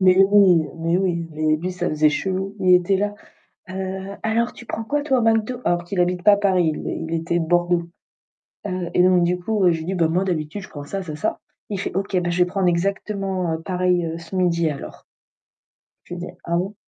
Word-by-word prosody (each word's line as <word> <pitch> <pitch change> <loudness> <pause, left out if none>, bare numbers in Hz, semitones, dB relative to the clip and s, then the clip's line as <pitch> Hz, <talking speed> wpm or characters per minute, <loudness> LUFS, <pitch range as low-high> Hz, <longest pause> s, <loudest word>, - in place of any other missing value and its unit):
Mais 185 -1 +5
oui, 185 -6 +5
mais 165 +1 +1
oui, 170 -3 -1
mais 155 0 +1
lui 180 +4 -4
ça 180 - -2
faisait 155 0 +3
chelou, 190 +4 -2
il 185 -1 +5
était 180 +2 +3
là: 205 +1 -1 0.6
«Heu, 190 +1 -5
alors 230 +2 0
tu 240 - -12
prends 225 - -4
quoi 290 +6 -1
toi 265 -4 +2
au - - +1
McDo?» 225 +2 +1
alors 175 0 +1
qu'il 180 +2 -4
habite 180 0 +1
pas 205 -1 +6
Paris, 185 -5 +2
il 160 +1 -4
était 165 +1 0
Bordeaux, 175 +1 +1 0.8
heu 185 -3 -3
et 180 - +5
donc 180 -1 +4
du 180 +1 +1
coup, 190 -1 +2
j'ai 160 -1 -2
dit: 190 - -2
«Beh, 170 -3 +2
moi 180 +4 +1
d'habitude, 175 +1 -3
je - - -10
prends 145 -1 -8
ça, 195 +6 -4
ça 170 -4 -6
et - - -6
ça». 155 - -2 0.3
Il 200 - -2
fait - - -4
OK, 195 0 -1
beh, 175 - -1
je 175 - -1
vais 180 - +4
prendre 185 0 0
exactement 190 -1 -1
pareil 180 -1 0
ce 170 +3 -11
midi 170 -3 +2
alors. 140 - -8 1.0
Je - - -7
lui 175 - -7
dis: 180 - -6
«Ah 170 0 0
bon? 195 +4 -3
180 Hz, 215 wpm, -22 LUFS, 170-195 Hz, 1.0 s, pas